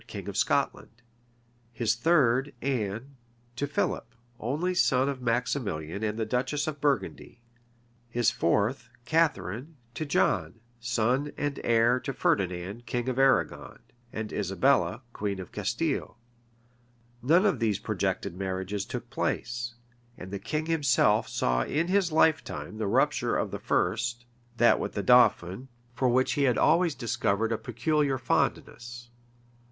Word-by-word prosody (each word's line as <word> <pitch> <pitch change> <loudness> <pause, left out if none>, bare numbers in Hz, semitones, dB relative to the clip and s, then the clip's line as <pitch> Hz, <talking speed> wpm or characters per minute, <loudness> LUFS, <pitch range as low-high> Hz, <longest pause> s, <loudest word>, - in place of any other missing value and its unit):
king - - -7
of - - -5
Scotland; 115 +2 -1 0.7
his 115 -3 0
third, 135 -1 +2
Anne, 125 +1 -3 0.4
to 145 +4 -2
Philip, 115 -4 -2 0.2
only 150 +11 -1
son 135 -7 +3
of 135 -2 -3
Maximilian 115 - -2
and 105 0 -1
the 110 - -1
duchess 130 +6 -1
of 150 -2 -5
Burgundy; 140 -4 -1 0.7
his 120 0 +2
fourth, 110 +7 0 0.2
Catharine, 160 - 0 0.2
to 155 - -4
John, 110 - 0 0.2
son 120 +5 0
and 145 -1 -2
heir 120 +2 +3
to 135 - -5
Ferdinand, 100 -1 -1
king 120 +2 -2
of 130 +1 -2
Arragon, 135 0 +2 0.3
and 110 -1 -5
Isabella, 110 +5 +1
queen 100 -2 -3
of 95 - -8
Castile.[*] 120 - -2 1.0
None 165 - +4
of 185 - +2
these 110 -4 +1
projected - - -2
marriages 95 +1 -3
took - - -5
place; 120 0 -2 0.4
and 95 - -9
the 100 - -4
king 150 +10 -3
himself 140 -9 +2
saw 60 0 +1
in 160 - -1
his 190 -3 +2
lifetime 155 -8 +1
the 110 - -1
rupture - - +1
of - - -2
the - - -5
first, 120 +2 -1 0.3
that 120 +1 +5
with - - -4
the 100 - -2
dauphin, 125 -1 +4 0.3
for 130 0 +1
which 130 +2 +2
he 140 - +2
had 125 -4 +2
always 170 -3 +3
discovered 115 -3 0
a 115 - +1
peculiar 135 +5 0
fondness. 120 0 -2
120 Hz, 135 wpm, -28 LUFS, 110-140 Hz, 1.0 s, that